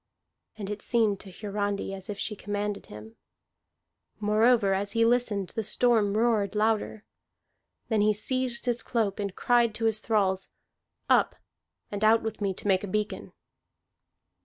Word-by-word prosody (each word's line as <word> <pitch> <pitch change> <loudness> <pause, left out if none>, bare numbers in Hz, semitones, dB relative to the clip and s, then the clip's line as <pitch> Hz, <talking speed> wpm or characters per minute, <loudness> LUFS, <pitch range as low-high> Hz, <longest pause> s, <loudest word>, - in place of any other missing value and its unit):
And 205 -1 -5
it 210 - -5
seemed 220 -5 +1
to 195 - -10
Hiarandi 200 0 -3
as 190 0 -8
if 205 - -4
she 210 - -3
commanded 205 0 -4
him. 110 +2 -11 1.0
Moreover, 215 0 +3
as 200 +1 -2
he 230 0 +3
listened, 230 -5 +1
the 225 - -3
storm 215 -2 +2
roared 220 -3 +1
louder. 215 0 0 0.8
Then 220 -3 +1
he 210 +1 +4
seized 250 +4 -2
his 240 -1 0
cloak, 220 -5 -1
and 200 -2 -3
cried 235 -2 +2
to 225 - -2
his 220 -1 +2
thralls, 195 -4 0 0.6
"Up, - - +3 0.6
and 205 0 -3
out 220 +1 +5
with 220 -1 -5
me 200 -1 +1
to 190 - -6
make 190 -1 +3
a - - -3
beacon!" 210 +2 -3
210 Hz, 155 wpm, -27 LUFS, 200-225 Hz, 1.0 s, out